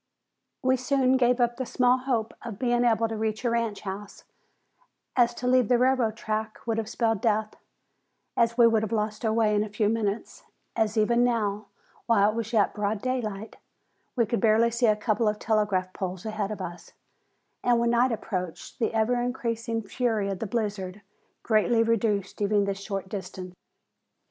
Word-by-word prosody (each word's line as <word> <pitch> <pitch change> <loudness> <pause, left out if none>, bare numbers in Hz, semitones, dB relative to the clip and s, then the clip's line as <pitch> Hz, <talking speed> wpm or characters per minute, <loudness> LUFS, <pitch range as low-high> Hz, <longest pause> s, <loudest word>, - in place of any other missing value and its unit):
We 260 0 +3
soon 260 0 +2
gave 250 -1 +3
up 240 0 +1
the 260 - -2
small 250 0 +3
hope 245 -4 -1
of 230 -4 -7
being 240 0 +1
able 230 -1 +3
to 225 - -4
reach 220 +2 -2
a 235 - +2
ranch 230 -3 -1
house, 200 +1 -7 0.9
as 240 -1 +3
to 250 - -6
leave 250 -2 +4
the 245 - +4
railroad 250 -3 +2
track 215 0 -3
would 225 -1 0
have 220 -1 -4
spelled 225 -3 0
death, 215 -1 +1 0.8
as 235 0 +2
we 240 - +7
would 225 -2 +4
have 220 - -3
lost 215 0 -2
our 220 - +2
way 220 -1 +2
in 205 0 +2
a 215 - -6
few 205 0 0
minutes, 215 -1 -2 0.3
as 220 -1 0
even 235 +3 +3
now, 215 -4 0 0.4
while 210 -3 +4
it - - -8
was 230 -1 -3
yet 215 -4 +2
broad 210 0 -1
daylight, 220 -4 -3 0.6
we 235 -3 +3
could 235 +2 -1
barely 225 +1 +4
see 235 +1 +2
a 215 - +4
couple 215 +1 0
of 210 0 +1
telegraph 205 -4 0
poles 185 0 -5
ahead 215 -2 -2
of 210 -2 -5
us, 175 -1 -8 0.7
and 245 -1 +3
when 235 0 +2
night 240 +2 +3
approached 185 -6 -5
the 225 -1 0
ever 240 +2 +2
increasing 230 -2 -2
fury 215 -1 -1
of 195 -2 -4
the 225 - -3
blizzard 205 -2 -3 0.4
greatly 225 +1 +3
reduced 210 -4 0
even 205 0 +2
this 200 0 -3
short 195 -1 -4
distance. 185 -2 -7
220 Hz, 185 wpm, -27 LUFS, 210-235 Hz, 0.9 s, we